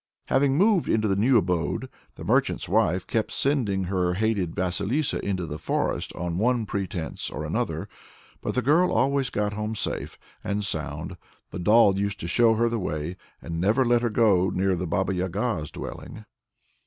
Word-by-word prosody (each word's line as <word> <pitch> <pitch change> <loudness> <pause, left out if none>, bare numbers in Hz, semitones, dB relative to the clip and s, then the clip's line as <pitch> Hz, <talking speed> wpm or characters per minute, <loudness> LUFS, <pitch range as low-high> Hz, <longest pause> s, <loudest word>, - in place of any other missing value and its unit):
Having 135 +1 +3
moved 200 -1 +3
into 110 -1 +2
the 95 - +1
new 120 +6 +4
abode, 90 -6 0 0.3
the - - -9
merchant's - - +1
wife 90 +3 +2
kept 110 -1 -1
sending 115 -9 0
her 90 -1 0
hated 100 -4 0
Vasilissa 100 - -1
into 95 -3 -2
the 75 -1 -6
forest - - -1
on 85 0 -3
one 120 +1 +2
pretence 95 -5 -3
or - - -5
another. - - -2 0.5
But - - -3
the 125 - +1
girl 165 +8 +4
always 135 +2 +1
got 105 0 -1
home 105 +1 -3
safe - - -3 0.3
and 100 0 -1
sound; - - -3 0.3
the - - -5
doll 100 +1 +5
used 100 0 -2
to 85 - -4
show 115 +4 +4
her 115 +2 +2
the 115 -1 -1
way, 80 -1 -3 0.3
and 85 0 -4
never 110 +8 +3
let 120 0 +3
her 120 - +1
go 100 -5 +3
near 95 +1 +1
the 90 0 -2
Baba 95 +3 0
Yaga's 95 - -2
dwelling. 110 - -8
100 Hz, 175 wpm, -25 LUFS, 90-120 Hz, 0.5 s, doll